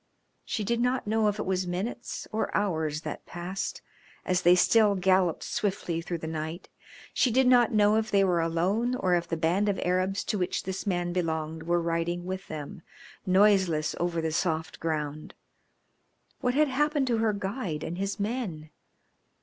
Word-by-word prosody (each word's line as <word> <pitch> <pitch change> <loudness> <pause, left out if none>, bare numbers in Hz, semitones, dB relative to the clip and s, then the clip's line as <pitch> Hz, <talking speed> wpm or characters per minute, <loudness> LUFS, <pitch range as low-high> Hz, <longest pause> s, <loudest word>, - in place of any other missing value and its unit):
She 215 - -3
did 235 +3 0
not 250 +1 +1
know 215 +1 +2
if 205 0 0
it 210 - -3
was 185 -1 -1
minutes 195 +7 -4
or 220 - -1
hours 160 -7 -1
that - - -7
passed 180 +3 -5 0.4
as 180 -1 +1
they 175 0 +6
still 210 +2 +4
galloped 185 -2 +2
swiftly 180 -5 -2
through 170 0 -4
the 160 - -7
night. 160 +2 -5 0.4
She 255 - +3
did 260 +3 +3
not 245 -2 +5
know 210 0 +4
if 220 0 -1
they 200 -1 +4
were 180 -3 +2
alone 190 +9 0
or 185 -7 +1
if 175 -1 +1
the 165 - -2
band 175 +6 +1
of 200 - -1
Arabs 185 +2 0
to 210 - -2
which 180 - -1
this 190 +2 -5
man 175 -2 0
belonged 160 -2 -2
were 170 +1 +1
riding 170 +1 -1
with 190 +1 -5
them, 155 +1 -7 0.5
noiseless 185 -5 +3
over 170 -1 0
the 160 0 -1
soft 160 0 -1
ground. 155 -2 -3 1.0
What 250 0 0
had 305 +1 +4
happened 295 +1 +1
to 235 -3 +1
her 220 -1 +2
guide 195 - -3
and 175 +2 -5
his 195 +1 -2
men? 200 -9 -3
185 Hz, 175 wpm, -28 LUFS, 165-210 Hz, 1.0 s, they